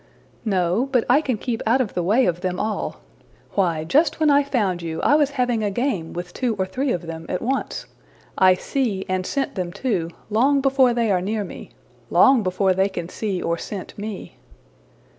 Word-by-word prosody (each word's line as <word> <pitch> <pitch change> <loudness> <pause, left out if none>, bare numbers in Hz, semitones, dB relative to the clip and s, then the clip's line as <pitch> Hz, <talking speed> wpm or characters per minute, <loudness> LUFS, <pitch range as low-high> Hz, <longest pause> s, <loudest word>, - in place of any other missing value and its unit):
'' - - -15
``No, 190 +6 +1
but 250 -4 +3
I 265 +5 +5
can 255 -7 -1
keep 230 +1 -3
out 245 +4 +4
of 245 -6 -1
the 180 - -1
way 215 +9 +3
of 175 0 -1
them 180 -1 -2
all. 215 0 -3 0.5
Why, 170 -5 +1
just 295 - +2
when 310 -2 +4
I 285 0 +5
found 210 -11 -1
you, 160 -1 -4
I - - +4
was 295 -2 +4
having 245 -3 +1
a 205 - +1
game 200 -6 -2
with 175 +1 -6
two 245 -4 -1
or 190 -2 -1
three 260 +8 -2
of 175 - -2
them 165 0 -7
at 180 - -1
once. 270 +3 -2 0.5
I 185 -1 +5
see, 205 -2 -2
and 185 0 -1
scent 275 -1 -1
them 180 -3 -3
too, 195 -5 -1 0.2
long 270 +6 +3
before 265 -2 +3
they 230 -3 +1
are 180 -2 +2
near 210 +3 -1
me 190 - -9 0.4
long 265 -3 +5
before 190 0 +1
they 190 +2 +2
can 175 -3 -5
see 200 -3 -3
or 170 0 -1
scent 195 -3 -7
me.'' 210 -1 -6
210 Hz, 205 wpm, -22 LUFS, 180-255 Hz, 0.5 s, I